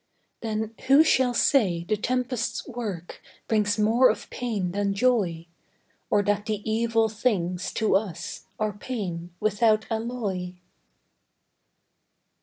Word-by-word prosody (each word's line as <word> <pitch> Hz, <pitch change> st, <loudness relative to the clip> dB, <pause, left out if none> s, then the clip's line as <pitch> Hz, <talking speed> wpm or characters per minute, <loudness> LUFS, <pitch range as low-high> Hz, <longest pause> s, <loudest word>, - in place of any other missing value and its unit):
Then 220 Hz, 0 st, -3 dB
who 275 Hz, +4 st, +7 dB
shall 255 Hz, -5 st, +3 dB
say 190 Hz, -, +3 dB
the 195 Hz, +5 st, 0 dB
tempest's 250 Hz, +1 st, -2 dB
work 210 Hz, -9 st, -6 dB, 0.3 s
Brings 210 Hz, -2 st, +1 dB
more 225 Hz, +4 st, +5 dB
of -, -, -3 dB
pain 210 Hz, -8 st, -2 dB
than 200 Hz, +1 st, -1 dB
joy; 200 Hz, -8 st, +1 dB, 0.6 s
Or 205 Hz, -1 st, +3 dB
that 205 Hz, +1 st, 0 dB
the 215 Hz, -1 st, -3 dB
evil 225 Hz, 0 st, +2 dB
things, 195 Hz, -5 st, -1 dB
to 220 Hz, -3 st, +2 dB
us 185 Hz, -4 st, -3 dB
Are 215 Hz, -1 st, 0 dB
pain, 190 Hz, -6 st, -5 dB
without 215 Hz, +1 st, +2 dB
alloy? 220 Hz, -6 st, -3 dB
215 Hz, 115 wpm, -26 LUFS, 195-235 Hz, 0.6 s, who